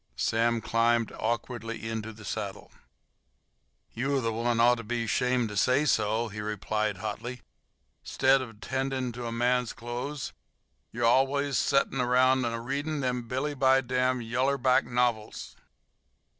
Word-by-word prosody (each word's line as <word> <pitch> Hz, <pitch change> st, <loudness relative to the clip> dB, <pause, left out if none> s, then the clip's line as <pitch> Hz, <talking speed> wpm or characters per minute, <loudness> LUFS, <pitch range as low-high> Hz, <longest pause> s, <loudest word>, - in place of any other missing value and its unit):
Sam 115 Hz, -, +1 dB
climbed 115 Hz, 0 st, +2 dB
awkwardly 115 Hz, 0 st, -3 dB
into 110 Hz, 0 st, -4 dB
the 105 Hz, -1 st, -13 dB
saddle. -, -, -5 dB, 1.2 s
"You're 135 Hz, +3 st, 0 dB
the 115 Hz, -3 st, -1 dB
one 115 Hz, +1 st, 0 dB
ought 120 Hz, +1 st, +5 dB
to -, -, -6 dB
be 115 Hz, +1 st, -2 dB
'shamed 125 Hz, +1 st, +1 dB
to 105 Hz, -, -7 dB
say 125 Hz, +8 st, +3 dB
so," 110 Hz, -3 st, +1 dB
he 105 Hz, 0 st, -6 dB
replied 105 Hz, 0 st, -2 dB
hotly. 115 Hz, +4 st, -5 dB, 0.6 s
"'Stead 135 Hz, 0 st, +3 dB
of 115 Hz, -4 st, -9 dB
'tendin' 130 Hz, -1 st, -2 dB
to 120 Hz, 0 st, -6 dB
a -, -, -4 dB
man's 125 Hz, +1 st, +1 dB
clothes 125 Hz, +5 st, -5 dB, 0.6 s
you're 120 Hz, +1 st, -1 dB
al'ays 135 Hz, +3 st, +3 dB
setting 140 Hz, -1 st, +1 dB
around 130 Hz, +1 st, +3 dB
a 115 Hz, 0 st, -2 dB
readin' 140 Hz, +5 st, -3 dB
them 125 Hz, -2 st, -2 dB
billy 135 Hz, +5 st, -2 dB
by 135 Hz, -1 st, +4 dB
dam 130 Hz, 0 st, 0 dB
yaller 130 Hz, +5 st, 0 dB
back 130 Hz, 0 st, +3 dB
novils." 120 Hz, -3 st, -1 dB
120 Hz, 145 wpm, -28 LUFS, 115-130 Hz, 1.2 s, ought